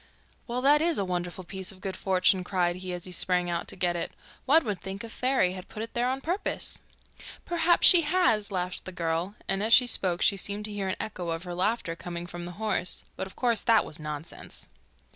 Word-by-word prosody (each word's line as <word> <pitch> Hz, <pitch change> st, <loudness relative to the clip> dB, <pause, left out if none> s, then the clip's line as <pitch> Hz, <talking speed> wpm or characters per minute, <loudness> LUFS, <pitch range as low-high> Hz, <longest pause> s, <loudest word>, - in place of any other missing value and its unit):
'Well, 245 Hz, +1 st, -2 dB
that 295 Hz, +2 st, +5 dB
is 335 Hz, 0 st, +2 dB
a 200 Hz, -, 0 dB
wonderful 180 Hz, 0 st, -4 dB
piece 190 Hz, +1 st, -5 dB
of 190 Hz, -, -15 dB
good 190 Hz, 0 st, -5 dB
fortune,' 185 Hz, 0 st, +2 dB
cried 180 Hz, -1 st, 0 dB
he, 185 Hz, 0 st, -6 dB
as 175 Hz, -1 st, -5 dB
he 185 Hz, -, -7 dB
sprang 180 Hz, -1 st, +1 dB
out 170 Hz, 0 st, -3 dB
to -, -, -6 dB
get 175 Hz, -1 st, 0 dB
it. 170 Hz, -, -3 dB, 0.4 s
'One 310 Hz, +2 st, +5 dB
would 205 Hz, -4 st, -3 dB
think 195 Hz, +3 st, -6 dB
a 230 Hz, -, -7 dB
fairy 250 Hz, -7 st, +1 dB
had 185 Hz, 0 st, -9 dB
put 215 Hz, -, -6 dB
it 225 Hz, -, -8 dB
there 240 Hz, +1 st, +1 dB
on 265 Hz, +1 st, -2 dB
purpose.' 355 Hz, +8 st, -2 dB, 0.6 s
'Perhaps 345 Hz, 0 st, +3 dB
she 355 Hz, -, +10 dB
has,' 295 Hz, -, +2 dB
laughed 180 Hz, -1 st, -3 dB
the 185 Hz, -, -6 dB
girl, 170 Hz, +3 st, -2 dB
and 195 Hz, 0 st, 0 dB
as 220 Hz, +2 st, +2 dB
she 250 Hz, -, +5 dB
spoke 185 Hz, -7 st, +4 dB
she 200 Hz, -, +3 dB
seemed 205 Hz, +2 st, -2 dB
to 210 Hz, -, -3 dB
hear 200 Hz, -2 st, -3 dB
an 185 Hz, -, -1 dB
echo 180 Hz, -5 st, -5 dB
of 165 Hz, +1 st, -3 dB
her 180 Hz, -1 st, -6 dB
laughter 185 Hz, -1 st, -1 dB
coming 170 Hz, 0 st, -6 dB
from 175 Hz, 0 st, -7 dB
the 175 Hz, -, -7 dB
horse, 210 Hz, -3 st, 0 dB
but 190 Hz, -, -4 dB
of 190 Hz, -, -14 dB
course 235 Hz, -4 st, +1 dB
that 225 Hz, -2 st, +4 dB
was 155 Hz, -, -7 dB
nonsense. 150 Hz, +1 st, -7 dB
190 Hz, 230 wpm, -27 LUFS, 180-230 Hz, 0.6 s, she